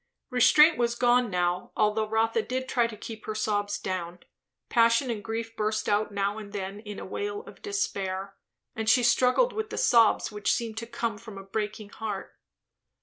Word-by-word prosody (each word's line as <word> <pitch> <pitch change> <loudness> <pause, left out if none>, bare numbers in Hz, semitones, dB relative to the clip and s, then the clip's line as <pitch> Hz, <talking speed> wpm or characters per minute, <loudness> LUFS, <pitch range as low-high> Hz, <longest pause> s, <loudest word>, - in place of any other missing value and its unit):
Restraint 300 +5 +6
was 235 0 +1
gone 245 0 +3
now, 180 -1 -1
although 215 0 +1
Rotha 225 +1 +1
did 260 +3 -3
try 240 -3 +2
to 220 -2 -9
keep 220 0 -9
her 215 - -3
sobs 205 -1 -1
down; 180 -2 -4 0.5
passion 230 +2 +3
and 210 -3 -5
grief 225 +1 -4
burst 215 0 -1
out 210 +1 +1
now 200 +1 -1
and 205 -2 -10
then 195 0 -5
in 210 -1 -8
a - - -7
wail 410 - -4
of - - -14
despair, 195 - -3 0.4
and 220 0 -1
she 245 +1 +5
struggled 255 - +3
with 435 0 -3
the - - -6
sobs 230 -2 +4
which 210 -1 0
seemed 225 -2 -3
to 230 +1 -4
come 225 -2 -3
from 220 -3 -10
a 195 - -8
breaking 210 +1 -4
heart. 210 -3 -6
220 Hz, 185 wpm, -27 LUFS, 205-240 Hz, 0.5 s, Restraint